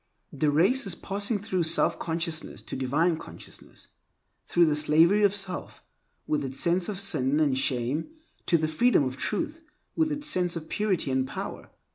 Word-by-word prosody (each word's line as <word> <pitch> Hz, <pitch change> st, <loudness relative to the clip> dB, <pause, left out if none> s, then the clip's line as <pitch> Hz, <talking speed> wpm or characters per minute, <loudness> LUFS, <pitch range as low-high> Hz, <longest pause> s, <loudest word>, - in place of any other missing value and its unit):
The 150 Hz, +1 st, +1 dB
race 195 Hz, -, +2 dB
is 180 Hz, -, -2 dB
passing 200 Hz, +4 st, -2 dB
through 195 Hz, -3 st, -2 dB
self 160 Hz, 0 st, +2 dB
consciousness 165 Hz, -1 st, -3 dB
to -, -, -6 dB
divine 150 Hz, +6 st, +1 dB
consciousness; -, -, -12 dB, 0.6 s
through 175 Hz, -, +4 dB
the 155 Hz, -2 st, +1 dB
slavery 160 Hz, +7 st, +4 dB
of 205 Hz, -1 st, +3 dB
self, 195 Hz, -3 st, -3 dB, 0.4 s
with 150 Hz, -1 st, -1 dB
its 135 Hz, 0 st, -4 dB
sense 175 Hz, +2 st, +1 dB
of 200 Hz, -3 st, -3 dB
sin 150 Hz, -7 st, +1 dB
and 145 Hz, -4 st, +2 dB
shame, 130 Hz, -, -1 dB, 0.4 s
to 170 Hz, -, +4 dB
the 160 Hz, -1 st, 0 dB
freedom 160 Hz, +4 st, +3 dB
of 130 Hz, -1 st, -3 dB
Truth, 320 Hz, -, -3 dB, 0.3 s
with 315 Hz, -1 st, +1 dB
its 295 Hz, 0 st, -3 dB
sense 180 Hz, -, +2 dB
of 160 Hz, -1 st, -7 dB
purity 195 Hz, -9 st, 0 dB
and 130 Hz, 0 st, 0 dB
power. -, -, -7 dB
170 Hz, 170 wpm, -27 LUFS, 150-200 Hz, 0.6 s, through